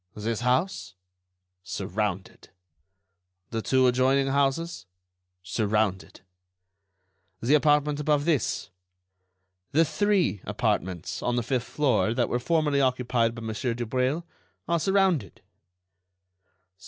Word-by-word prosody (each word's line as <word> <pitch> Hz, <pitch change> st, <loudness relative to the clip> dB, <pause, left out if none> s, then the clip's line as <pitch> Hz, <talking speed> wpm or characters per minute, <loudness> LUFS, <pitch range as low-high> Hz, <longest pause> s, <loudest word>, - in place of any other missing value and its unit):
"This 110 Hz, +1 st, -2 dB
house?" 125 Hz, -, 0 dB, 0.7 s
"Surrounded." 95 Hz, +1 st, -4 dB, 1.0 s
"The 115 Hz, -1 st, -2 dB
two 130 Hz, +3 st, +3 dB
adjoining 130 Hz, +2 st, +3 dB
houses?" 140 Hz, -, 0 dB, 0.6 s
"Surrounded." 105 Hz, -1 st, -1 dB, 1.2 s
"The 125 Hz, +5 st, +1 dB
apartment 150 Hz, 0 st, +3 dB
above 150 Hz, -1 st, +1 dB
this?" 150 Hz, -11 st, 0 dB, 1.0 s
"The 165 Hz, +3 st, +5 dB
three 195 Hz, -, +1 dB
apartments 90 Hz, -2 st, -2 dB
on 120 Hz, -, 0 dB
the 120 Hz, -, 0 dB
fifth 125 Hz, 0 st, -2 dB
floor 130 Hz, -6 st, +1 dB
that 120 Hz, -1 st, +1 dB
were 120 Hz, -, 0 dB
formerly 150 Hz, 0 st, +1 dB
occupied 125 Hz, -3 st, +1 dB
by 115 Hz, -, -8 dB
Monsieur 115 Hz, +2 st, -2 dB
Dubreuil 130 Hz, +7 st, -1 dB, 0.4 s
are 170 Hz, 0 st, +1 dB
surrounded." 190 Hz, -, +1 dB
130 Hz, 100 wpm, -26 LUFS, 110-150 Hz, 1.2 s, The